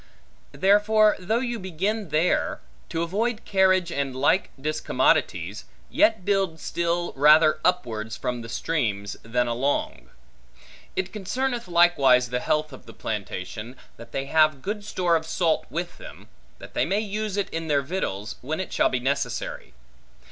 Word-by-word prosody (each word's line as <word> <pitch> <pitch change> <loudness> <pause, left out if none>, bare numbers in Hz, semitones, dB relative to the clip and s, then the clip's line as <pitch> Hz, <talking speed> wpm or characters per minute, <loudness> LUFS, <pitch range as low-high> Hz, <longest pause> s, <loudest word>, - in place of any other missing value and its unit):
Therefore, 210 +2 +4
though 220 +6 0
you 240 -2 -3
begin 190 +2 -2
there, 155 +4 +1 0.3
to 165 - -1
avoid 215 +6 -2
carriage 185 -2 +3
and 140 -4 -2
like 180 +8 +2
discommodities, 155 +3 0 0.3
yet 315 - +3
build 195 -5 +1
still 170 +2 -1
rather 155 +2 +5
upwards 115 -12 -1
from 125 -1 -3
the 115 - -9
streams, 105 -9 -2
than 125 +2 0
along. 120 - -1 0.9
It 190 0 -2
concerneth 240 +3 -2
likewise 140 -8 +4
the 125 - 0
health 155 +2 -1
of 130 - -13
the - - -12
plantation, 105 +2 -5 0.2
that 115 0 -12
they 135 +2 -3
have 155 -2 +3
good 210 +1 -3
store 180 -4 +1
of 160 0 -1
salt 165 -1 0
with 175 +2 -5
them, - - -12 0.3
that - - -12
they - - +1
may 200 +3 +1
use 210 -1 -3
it 200 - 0
in 165 0 -4
their 145 -2 +2
victuals, 130 - -4
when 155 +6 -3
it 190 - -5
shall - - +3
be 130 - -1
necessary. 125 - -3
165 Hz, 150 wpm, -25 LUFS, 130-190 Hz, 0.9 s, rather